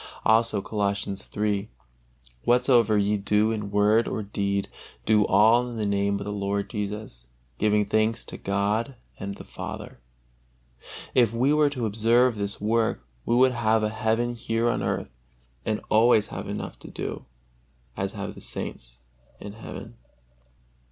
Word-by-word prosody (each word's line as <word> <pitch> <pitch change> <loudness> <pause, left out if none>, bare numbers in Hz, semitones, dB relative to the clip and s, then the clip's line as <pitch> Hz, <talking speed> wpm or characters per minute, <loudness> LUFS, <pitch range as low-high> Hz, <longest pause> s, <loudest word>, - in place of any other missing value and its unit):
Also 110 -2 +3
Colossians 100 -2 -2
iii: 105 0 0 0.7
"Whatsoever 120 -3 +4
ye 105 +1 +2
do 105 +2 +2
in 105 -2 -3
word 105 +3 +3
or 110 - -2
deed, 100 -1 -1 0.4
do 105 -2 +4
all 120 +3 +5
in 120 - -6
the 110 - -1
Name 100 0 +1
of 100 - -6
the 105 - -3
Lord 100 0 -2
Jesus, 105 - -5 0.3
giving 105 -1 +3
thanks 110 +2 +1
to - - -9
God 105 +6 -1 0.2
and 100 0 -5
the - - -10
Father." - - -8 1.1
If 120 -3 +4
we 130 +5 +3
were 150 -1 +4
to 130 -5 -3
observe 115 +3 +3
this 100 -1 -3
work, 110 +1 0 0.2
we 120 - +3
would 130 +1 +5
have 110 -2 +2
a 105 - +1
heaven 110 +2 0
here 115 0 0
on - - -2
earth - - -2 0.5
and 110 -1 0
always 110 -1 +5
have - - -5
enough - - -5
to - - -11
do, - - -5 0.7
as - - -3
have - - -5
the - - -13
saints - - -6 0.4
in 100 0 -8
heaven. 105 - -9
110 Hz, 150 wpm, -26 LUFS, 100-115 Hz, 1.1 s, all